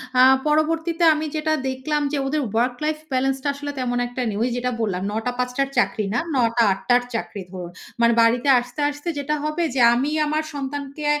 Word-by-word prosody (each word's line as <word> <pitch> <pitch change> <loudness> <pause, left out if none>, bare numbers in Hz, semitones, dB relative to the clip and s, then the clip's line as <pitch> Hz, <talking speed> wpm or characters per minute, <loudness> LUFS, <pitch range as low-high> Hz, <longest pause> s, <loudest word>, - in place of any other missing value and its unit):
অ্যা 255 - +6 0.2
পরবর্তীতে 325 +3 +1
আমি 310 0 -2
যেটা 310 0 0 0.2
দেখলাম 295 +3 -2
যে, 295 - -1
ওদের 300 +2 0
ওয়ার্ক 245 +2 +1
লাইফ 305 0 0 0.2
বেলেন্সটা 270 +1 0
আসলে 285 +1 -5
তেমন 245 -1 -1
একটা 245 +1 -5
নেই। 205 -2 -2
ওই 250 - +1
যেটা 250 0 -1
বললাম 190 -5 -1
৯ 215 +2 -2
টা 250 - 0
থেকে 245 - -11
৫ 250 0 0
টার 275 0 +1
চাকরি 220 -3 +1
না, 245 - +1 0.2
৯ 235 -3 +3
টা - - -13
থেকে 235 - +6
৮ 195 - -2
টার 245 0 +5
চাকরি 220 -2 -4
ধরুন। 180 -2 -7 0.3
মানে 235 0 +5
বাড়িতে 240 +4 +3
আসতে, 245 +3 -9
আসতে 290 +3 -9
যেটা 295 +2 -1
হবে 305 +3 -1
যে, - - +1 0.2
আমি 275 +5 0
আমার 305 +1 0
সন্তানকে 285 +1 -5
265 Hz, 220 wpm, -22 LUFS, 240-300 Hz, 0.3 s, অ্যা